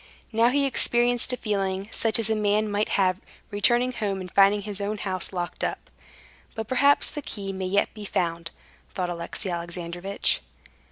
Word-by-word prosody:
Now 230 +1 +4
he 280 +2 +2
experienced 245 -2 +2
a 250 - -1
feeling 195 -3 -2
such 225 -2 +3
as 225 -2 +2
a 220 - +1
man 210 0 +1
might 205 +1 0
have, 185 -2 +3 0.3
returning 240 +5 +3
home 205 -5 -2
and 185 -1 -7
finding 200 +1 +4
his 205 -1 -5
own 210 +1 -2
house 185 -3 -2
locked 175 -2 -4
up. - - -3 0.6
"But 220 -2 -4
perhaps 280 +4 +4
the 295 - -5
key 195 -7 -5
may 190 -1 -3
yet 200 +2 +1
be 215 - -9
found," 170 -3 -2 0.4
thought 180 -2 -3
Alexey 175 +3 -4
Alexandrovitch. 175 +2 -2
205 Hz, 170 wpm, -25 LUFS, 185-225 Hz, 0.6 s, Now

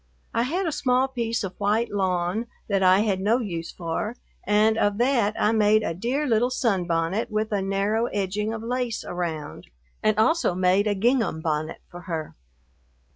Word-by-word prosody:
I 230 - +1
had 340 +11 -1
a 325 - 0
small 255 -2 +2
piece 230 -4 -2
of 190 -2 -6
white 210 +3 +1
lawn 190 +2 -1 0.2
that 195 -2 +1
I 185 +1 +5
had 200 -3 0
no 210 +5 +2
use 170 -9 -4
for, 175 +7 -3 0.3
and 210 +2 +4
of 205 -2 +1
that 235 -4 +2
I 210 - +3
made 215 -1 +3
a - - -1
dear 245 - -1
little 240 -1 +2
sunbonnet 185 -5 0
with 215 +1 -1
a 205 -2 0
narrow 200 +4 0
edging 205 +1 -2
of 225 0 -5
lace 245 -1 -2
around, 165 -4 -5 0.3
and 215 0 +2
also 270 - +2
made 185 +3 +3
a 205 - +1
gingham 230 -4 +1
bonnet 155 -1 -2
for 175 0 -10
her. 160 -2 -4
210 Hz, 175 wpm, -25 LUFS, 185-230 Hz, 0.3 s, I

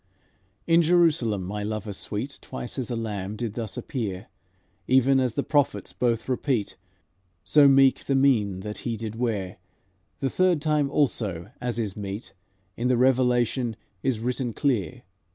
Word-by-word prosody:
'" 95 0 -41
"In 170 - +7
Jerusalem 160 - +3
my 105 +3 -4
Lover 105 0 -4
sweet 110 +8 -4
Twice 125 - -6
as 125 - -3
a 120 - -2
lamb 105 -3 -4
did 115 -2 -3
thus 115 -3 -5
appear, 100 -8 -4 0.6
Even 130 +1 +4
as 125 -3 +1
the 140 - 0
prophets 145 -3 0
both 120 -2 0
repeat, 125 -4 -1 0.7
So 145 -2 +6
meek 135 -1 +5
the 135 - +1
mien 110 -9 +2
that 105 +1 -6
He 115 -2 -3
did 110 0 -5
wear; 105 -6 -2 0.6
The 135 - -1
third 185 -3 +3
time 150 -2 +1
also, 105 - -1
as 120 -1 -2
is 105 -5 -2
meet, 100 +1 -6 0.4
In 120 - -1
the 125 -1 +3
Revelation 125 -2 +2 0.3
is 130 -4 0
written 125 0 -2
clear. 110 - -1
120 Hz, 155 wpm, -25 LUFS, 105-135 Hz, 0.7 s, In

